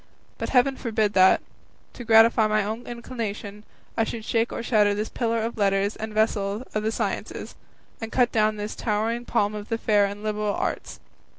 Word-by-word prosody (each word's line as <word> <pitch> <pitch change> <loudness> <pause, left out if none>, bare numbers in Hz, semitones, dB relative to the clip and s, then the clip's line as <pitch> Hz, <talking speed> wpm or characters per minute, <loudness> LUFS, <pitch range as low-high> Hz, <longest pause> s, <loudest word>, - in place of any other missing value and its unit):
But - - -3
heaven 265 +1 +3
forbid 215 -3 0
that, 185 0 +5 0.5
to 245 - -8
gratify 225 0 +5
my 215 0 +1
own 220 +4 -5
inclination, 225 -4 -6 0.3
I 225 - +2
should 225 0 -5
shake 230 0 0
or - - -4
shatter 210 -4 +3
this 210 +1 -3
pillar 230 -2 -1
of 230 0 -4
letters 200 +1 +1
and 220 0 -6
vessel 210 0 0
of 215 - 0
the 220 +1 -1
sciences, - - -4 0.5
and 225 0 -5
cut 245 -2 +2
down 215 -1 +2
this 210 +1 -5
towering 225 +2 -1
palm 210 -4 +1
of 210 0 -7
the 225 - 0
fair 210 -3 +3
and 205 +1 -6
liberal 210 -1 -1
arts. - - -3
215 Hz, 185 wpm, -25 LUFS, 210-230 Hz, 0.5 s, that